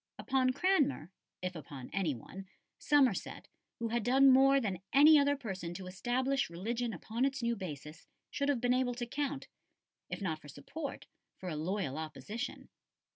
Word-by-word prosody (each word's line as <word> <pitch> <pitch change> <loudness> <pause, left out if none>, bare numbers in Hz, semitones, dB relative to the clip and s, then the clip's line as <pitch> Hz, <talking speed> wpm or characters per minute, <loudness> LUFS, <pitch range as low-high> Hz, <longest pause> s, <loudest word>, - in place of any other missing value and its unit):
Upon 260 -1 +1
Cranmer, 285 - +1 0.3
if 185 0 -2
upon 140 -4 -9
any 175 -8 0
one, 190 +11 -10 0.3
Somerset, 270 -8 +2 0.3
who 230 -1 -2
had 235 +1 0
done 265 +3 +6
more 270 +1 +6
than 195 -8 -3
any 300 +2 +8
other 285 0 +3
person 190 -9 -5
to 185 - -7
establish 255 +8 0
religion 230 +8 -2
upon 220 +6 -3
its 270 -2 0
new 235 0 +1
basis, 155 -6 -8 0.2
should 280 0 -1
have 280 -4 +2
been 245 0 +3
able 250 -1 +1
to 240 0 -3
count, 280 +2 -3 0.6
if - - -4
not 160 -6 -3
for - - -13
support, 270 - -7 0.3
for 185 - -6
a 160 - -3
loyal 160 -2 -2
opposition. 210 - -6
235 Hz, 165 wpm, -33 LUFS, 180-270 Hz, 0.6 s, any